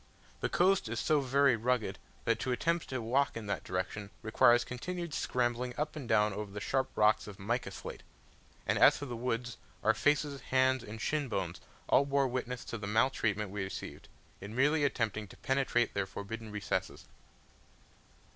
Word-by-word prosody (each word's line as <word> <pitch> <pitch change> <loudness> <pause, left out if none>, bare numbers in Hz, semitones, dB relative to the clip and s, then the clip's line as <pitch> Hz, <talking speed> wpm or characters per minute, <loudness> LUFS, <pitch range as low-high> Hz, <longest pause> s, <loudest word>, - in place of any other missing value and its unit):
The - - -1
coast 185 - +3
is 115 0 -2
so 155 -1 +3
very 135 0 +4
rugged 115 -3 0 0.3
that 115 -1 +2
to 130 - -1
attempt 165 +6 0
to 130 - -2
walk 135 +3 +1
in 110 - -6
that 100 - -2
direction 95 +2 -3
requires 120 +2 +5
continued 170 +7 -5
scrambling 125 -2 -1
up 150 +1 -2
and 140 -6 -6
down 105 -2 +4
over 105 0 -5
the 105 - -5
sharp 130 +5 0
rocks 105 0 +4
of 100 -2 -9
mica 120 +6 -1
slate; - - -8 0.6
and - - +1
as - - +7
for 145 - -5
the 125 -3 -5
woods, 120 0 -2 0.3
our 110 - +5
faces, 145 -1 +1
hands, 130 -1 +2
and 110 0 -8
shin 150 -2 0
bones 95 -6 -3 0.3
all 140 - +5
bore 140 -1 +2
witness 125 -1 -3
to 115 - -5
the 100 - -5
maltreatment 110 -3 +1
we 100 -1 -3
received, 95 - -7 0.3
in 100 +3 -8
merely 145 +4 +3
attempting 110 -6 0
to - - -14
penetrate 135 -3 +1
their 100 -1 -1
forbidden 110 +3 -6
recesses. 105 -1 -3
120 Hz, 175 wpm, -32 LUFS, 105-135 Hz, 0.6 s, as